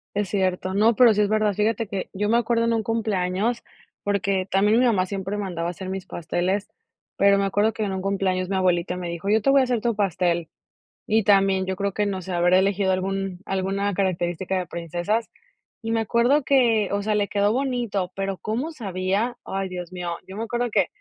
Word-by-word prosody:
Es 205 -2 -1
cierto. 185 -1 -1
No, 215 +3 +4
pero 240 -3 +6
sí 210 - +1
es 205 - +2
verdad. 215 -1 +2
Fíjate 220 +2 0
que 195 -3 -4
yo 205 +2 -1
me 235 - +4
acuerdo 230 0 +1
en 230 - +2
un 225 -1 0
cumpleaños, 215 0 -1 0.4
porque 195 -1 0
también 210 +4 +3
mi 255 - +4
mamá 195 -6 +2
siempre 195 +1 -4
mandaba 175 -4 -3
a - - -1
hacer 185 +1 -7
mis 190 -1 -4
pasteles, 180 +4 -2 0.5
pero 200 0 +5
me 200 - +1
acuerdo 205 +3 +1
que 220 - -3
en 200 - -2
un 190 - -3
cumpleaños 190 -1 -1
mi 195 - -1
abuelita 180 -1 +1
me 175 -1 -4
dijo: 170 +4 -4
"Yo 220 0 +3
te 275 - +1
voy 275 0 +6
a - - +3
hacer 245 -3 -1
tu 235 -3 0
pastel". 180 -5 0 0.6
Y 220 -1 +3
también 195 -2 +3
yo 190 - -1
creo 200 0 -2
que 210 - 0
no 190 -2 -3
sé, 185 +1 -7
habré 175 +2 +4
elegido 195 0 +1
algún 190 0 -2
alguna 195 +1 -1
característica 185 0 -1
de 180 - -2
princesas. 175 +7 -2 0.5
Y 225 0 -3
me 225 - +1
acuerdo 240 +6 +2
que, 235 -7 +3
o 200 0 -1
sea, 215 +1 0
le 205 -1 +1
quedó 205 +2 +1
bonito, 240 -8 -1
pero, 195 -1 -2
¿cómo 250 +10 -3
sabía? 200 - -2
Ay, 195 -1 -3
Dios 180 -1 -6
mío, 175 -2 -4
yo 190 - -9
me 220 - -3
acuerdo 240 0 -2
que 195 -5 +2
195 Hz, 215 wpm, -24 LUFS, 185-220 Hz, 0.6 s, pero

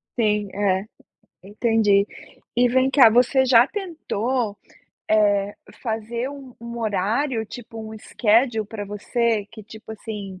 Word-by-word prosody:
Sim, 210 -3 +1
é, 195 -1 +1 0.6
entendi. 205 -1 +2 0.5
E 245 +1 +4
vem 260 +2 +2
cá, 255 -6 +7
você 250 +3 +3
já 245 0 +6
tentou, 255 - -3 0.5
eh, 205 -1 +3 0.3
fazer 230 +2 -3
um 275 -3 -11
um 235 0 -7
horário, 220 +4 -1
tipo 225 0 -10
um 220 0 -7
schedule 220 0 +1
pra 210 -1 -6
você, 210 +1 -1
que 215 -2 -10
tipo 220 +1 -11
assim: 205 -4 -7
220 Hz, 125 wpm, -23 LUFS, 205-245 Hz, 0.6 s, cá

